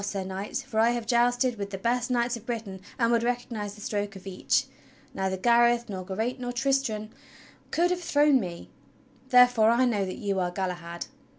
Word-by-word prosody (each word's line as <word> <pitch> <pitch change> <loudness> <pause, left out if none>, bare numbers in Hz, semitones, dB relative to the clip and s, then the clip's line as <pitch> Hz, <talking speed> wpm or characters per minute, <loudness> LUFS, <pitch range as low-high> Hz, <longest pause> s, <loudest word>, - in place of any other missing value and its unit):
Sir 200 -1 -3
Knight; 190 +2 -5
for 220 - -1
I 225 +1 +5
have 240 -2 -3
jousted 245 0 +2
with 200 0 -3
the 195 - -5
best 240 +4 0
knights 240 0 +1
of 230 - -9
Britain 215 -6 -5 0.2
and 230 -1 +2
would 235 -1 +3
recognize 235 -4 -3
the 210 - -13
stroke 205 -1 -3
of 190 - -11
each. 190 -1 0 0.5
Neither 190 0 -2
Gareth, 235 +2 +3
nor 190 -2 -5
Geraint, 220 +7 -3
nor 245 -1 -3
Tristram 245 -4 -1 0.6
could 350 +2 +2
have 360 0 -1
thrown 295 -4 +4
me. 175 -5 -7 0.6
Therefore 250 -3 +6
I 240 +2 +4
know 215 -5 +1
that 185 -1 -5
you 200 -2 -1
are 180 -1 0
Galahad!" 175 -2 -4
225 Hz, 190 wpm, -27 LUFS, 195-245 Hz, 0.6 s, Therefore